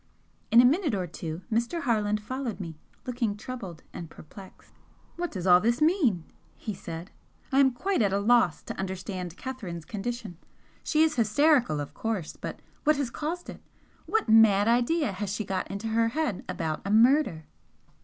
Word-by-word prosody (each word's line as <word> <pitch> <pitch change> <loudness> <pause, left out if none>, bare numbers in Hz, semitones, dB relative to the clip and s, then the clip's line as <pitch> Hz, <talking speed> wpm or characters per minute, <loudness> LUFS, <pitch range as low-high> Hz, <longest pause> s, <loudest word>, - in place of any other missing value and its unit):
In 230 - +7
a 245 - +8
minute 295 - +2
or 185 -2 -1
two 165 0 -6
Mr. 235 +10 0
Harland 210 -4 +1
followed 250 +1 -4
me, 165 -4 -6 0.3
looking 240 -5 -2
troubled 205 -8 -7
and 170 -2 -7
perplexed. 190 +6 -14 0.4
"What 350 0 -2
does 185 -3 -5
all 180 -1 +7
this 235 +4 +1
mean?" 305 - +2 0.3
he 215 - -5
said 170 0 -8 0.4
"I 270 - +3
am 275 -1 +6
quite 360 +7 -1
at 200 -3 +2
a 195 - +1
loss 210 -4 +3
to - - -7
understand 185 -2 -5
Catherine's 190 -11 -6
condition. 215 -4 -5 0.4
She 310 0 +3
is 315 -3 +1
hysterical, 245 - +3
of 145 - -5
course, 215 -8 -3
but - - -7 0.2
what 305 0 +4
has 275 -4 -2
caused 330 +6 -4
it? - - -9 0.5
What 440 - +1
mad 220 -2 +6
idea 245 +4 +2
has 195 +1 -4
she 210 +1 -3
got 190 -1 -3
into 200 +3 -4
her 225 +1 +2
head 265 -4 -2
about 165 -4 -2
a 200 - -4
murder?" 225 - +4
220 Hz, 175 wpm, -27 LUFS, 190-260 Hz, 0.5 s, a